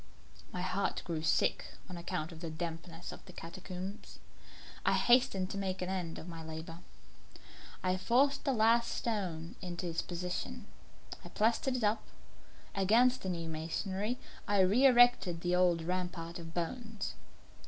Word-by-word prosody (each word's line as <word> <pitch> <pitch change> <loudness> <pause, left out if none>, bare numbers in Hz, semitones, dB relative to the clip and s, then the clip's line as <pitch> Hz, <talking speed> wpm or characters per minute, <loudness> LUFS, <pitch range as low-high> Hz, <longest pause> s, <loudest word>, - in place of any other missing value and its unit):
My 180 - -3
heart 195 +2 -1
grew 165 -2 -2
sick 160 - +1
on 180 - -7
account 170 -1 -3
of 165 - -10
the 165 -1 -4
dampness 165 +1 -5
of - - -10
the - - -9
catacombs. 185 +3 -7 0.7
I - - +3
hastened 220 -7 +4
to 200 - -3
make 190 -1 -2
an 180 - -3
end 180 -4 -2
of 160 - -8
my 165 -2 -7
labour. 160 +1 -7 1.0
I 185 0 +2
forced 270 +8 +3
the 280 - +2
last 235 0 +4
stone 180 -8 -2
into 175 -1 -4
its 165 0 -1
position; 180 +7 -4 0.6
I - - -9
plastered 235 +4 +2
it 245 - -1
up. 215 +1 +2 0.7
Against 235 +6 +4
the 190 - -3
new 170 -2 -2
masonry 190 +8 -2 0.3
I 205 -1 +4
re 215 +9 +6
erected 245 -9 +5
the 175 0 +2
old 175 -2 +3
rampart 175 -1 -3
of 165 -1 -8
bones. 215 +6 -3
185 Hz, 155 wpm, -33 LUFS, 170-215 Hz, 1.0 s, re